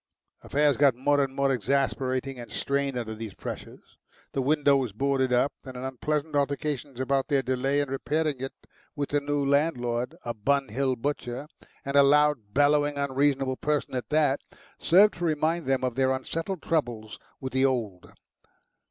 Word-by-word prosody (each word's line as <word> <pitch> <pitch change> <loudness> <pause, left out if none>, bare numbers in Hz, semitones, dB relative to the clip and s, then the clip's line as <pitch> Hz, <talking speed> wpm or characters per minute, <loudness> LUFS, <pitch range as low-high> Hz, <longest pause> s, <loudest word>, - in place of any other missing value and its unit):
Affairs 145 -2 +2
got 140 -3 +4
more 145 +3 +2
and 135 -1 -4
more 140 0 +2
exasperating 130 +2 -1
and 120 - -9
strained 140 -1 -1
under 115 -2 -4
these 110 -2 -7
pressures. - - -9 0.3
The 135 - -1
window 145 +1 +3
was 130 -6 -1
boarded 135 +2 0
up, 125 +3 +2
and 130 -1 -9
an 125 - -6
unpleasant 150 +4 -2
altercation 140 -2 -2
about 135 +1 0
their 140 -3 +1
delay 135 +2 0
in 145 - -2
repairing 150 +1 -1
it 135 +1 -4 0.4
with 145 -2 -2
the 145 - +2
new 145 0 -1
landlord, 135 -2 0
a 120 - -2
Bun 135 +5 0
Hill 130 +4 0
butcher 130 +1 -4 0.4
and 140 +1 -3
a 140 - +8
loud, 145 -6 +3
bellowing, 145 +2 +3
unreasonable 135 -1 +1
person 150 -2 -1
at 125 -1 -3
that 150 -2 +2 0.4
served 190 +2 +5
to - - -4
remind 160 0 0
them 135 -1 +1
of 130 -2 0
their 130 +1 +2
unsettled 165 +7 -4
troubles 120 -9 -2 0.2
with 130 -1 -6
the 130 +1 +3
old. 110 -9 -2
140 Hz, 170 wpm, -27 LUFS, 130-145 Hz, 0.4 s, a